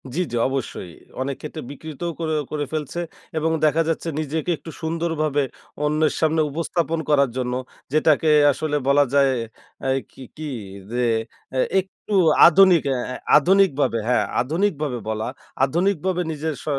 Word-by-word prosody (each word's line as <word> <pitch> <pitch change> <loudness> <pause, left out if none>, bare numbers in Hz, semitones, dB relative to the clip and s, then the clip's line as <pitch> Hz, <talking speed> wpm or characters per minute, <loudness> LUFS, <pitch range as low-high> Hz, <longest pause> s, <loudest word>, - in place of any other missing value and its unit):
জ্বি, 180 - +1
জ্বি। 120 - -1
অবশ্যই। 130 -9 -4 0.3
অনেক 135 0 -2
ক্ষেত্রে 155 +1 -6
বিকৃতও 160 +3 -6
করে 160 -1 -1 0.2
করে 145 -1 -2
ফেলছে। 155 +2 -3 0.4
এবং 160 +1 +1
দেখা 155 +2 +3
যাচ্ছে 165 +1 -2
নিজেকে 155 +3 -2
একটু 165 - -10
সুন্দরভাবে 160 -3 0 0.4
অন্যের 155 +1 +2
সামনে 160 0 +2
উপস্থাপন 165 +1 -1
করার 140 -3 +4
জন্য 125 -1 -1 0.4
যেটাকে 155 0 +3 0.2
আসলে 150 +2 -2
বলা 145 +1 +5
যায় 140 -1 +4 0.6
এ - - +1 0.2
কি 130 - -12
কি 155 -1 -5 0.4
যে, 125 +1 -1 0.6
এ - - +2 0.2
একটু 190 +2 -7 0.3
আধুনিক 180 -1 +6
এ - - -1 0.2
এ - - -5 0.2
আধুনিকভাবে 150 -8 +3
হ্যাঁ, 125 - +2 0.2
আধুনিকভাবে 155 -3 -1
বলা 110 +1 -2 0.4
আধুনিকভাবে 180 +3 0
নিজের 155 +1 -3
স - - -15
155 Hz, 145 wpm, -22 LUFS, 140-165 Hz, 0.6 s, আধুনিক